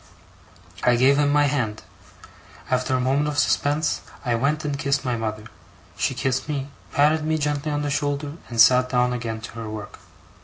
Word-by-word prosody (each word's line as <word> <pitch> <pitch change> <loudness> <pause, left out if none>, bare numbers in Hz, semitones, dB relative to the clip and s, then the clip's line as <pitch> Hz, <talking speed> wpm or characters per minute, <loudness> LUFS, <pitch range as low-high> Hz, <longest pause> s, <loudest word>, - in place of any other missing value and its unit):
I 125 - +4
gave 130 +3 +4
him 145 -1 +3
my 145 0 +4
hand. 120 -7 -1 0.9
After 130 0 +1
a - - +1
moment 135 +4 +1
of 150 -1 -3
suspense, 145 +2 +1 0.2
I 120 - +1
went 145 +6 0
and 145 -1 -2
kissed 140 -1 0
my 125 -1 0
mother: 110 -2 -4 0.5
she - - -1
kissed 135 +3 -1
me, 140 -2 -3 0.2
patted 155 +1 +3
me 155 0 0
gently 150 0 -1
on 145 0 -1
the 145 - -2
shoulder, 145 0 -1 0.2
and 115 -1 -5
sat 125 +2 +6
down 125 -1 +2
again 115 -2 -4
to 115 - -8
her 110 -1 -5
work. 105 -1 -8
135 Hz, 185 wpm, -23 LUFS, 120-145 Hz, 0.9 s, sat